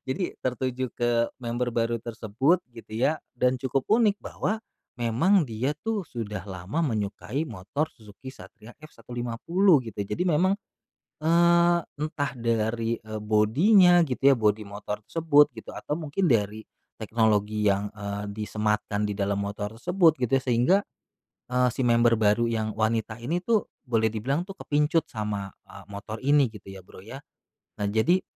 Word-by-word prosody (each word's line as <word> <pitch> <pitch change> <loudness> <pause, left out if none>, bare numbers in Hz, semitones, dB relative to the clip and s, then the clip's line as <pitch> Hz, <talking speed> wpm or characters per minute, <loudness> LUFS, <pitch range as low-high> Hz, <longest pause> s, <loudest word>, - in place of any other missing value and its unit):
Jadi, 155 +7 -2
tertuju 130 0 -2
ke 120 -1 0
member 120 0 -2
baru 115 0 0
tersebut, 115 - 0 0.2
gitu 115 - -12
ya. 130 +8 +1 0.2
Dan 125 0 +1
cukup 130 +1 -2
unik 215 -2 +3
bahwa 215 +3 -3 0.4
memang 145 - +3
dia 115 +6 -1
tuh 220 -4 -2
sudah 105 - -6
lama 100 - -3
menyukai 120 +5 -2
motor 115 +9 -3
Suzuki 110 0 -14
Satria 120 -3 -13
F150 140 +7 +1
gitu 110 - -11
ya. - - -12
Jadi 180 - -1
memang, 175 +4 +3 0.7
eee, 170 +2 +4 0.2
entah 145 -2 -2
dari, 115 0 0
eee, 110 0 -6
body-nya 165 - +5
gitu 135 +1 +3
ya, - - +4
body 105 0 +2
motor 105 +1 -6
tersebut 150 0 +4
gitu, 110 -2 -10
atau 150 +3 -4
mungkin 155 +1 0
dari 105 -1 0 0.3
teknologi 110 -1 +1
yang, 100 +1 +1
eee, 100 -1 -5
disematkan 105 0 -1
di 105 - -1
dalam 100 0 -1
motor 100 +1 -4
tersebut 170 +5 +3
gitu 125 -2 -2
ya. 135 -1 +3
Sehingga, 125 +10 +4 0.8
eee, 125 0 +3
si 125 +2 -2
member 120 -1 +4
baru 110 +2 +2
yang 110 -2 -2
wanita 110 0 -1
ini 155 +9 -1
tuh 225 -3 +1 0.2
boleh 115 -2 +2
dibilang 135 +10 -1
tuh 195 - -8
kepincut 155 -1 0
sama, 105 -3 -4 0.2
eee, 100 - -13
motor 100 +2 -7
ini 145 +1 +4
gitu 105 -2 -12
ya, 95 -1 -11
Bro, 95 - -14
ya. 115 +6 -9 0.7
Nah, 100 - 0
jadi, 170 - +2
120 Hz, 155 wpm, -26 LUFS, 105-150 Hz, 0.8 s, body-nya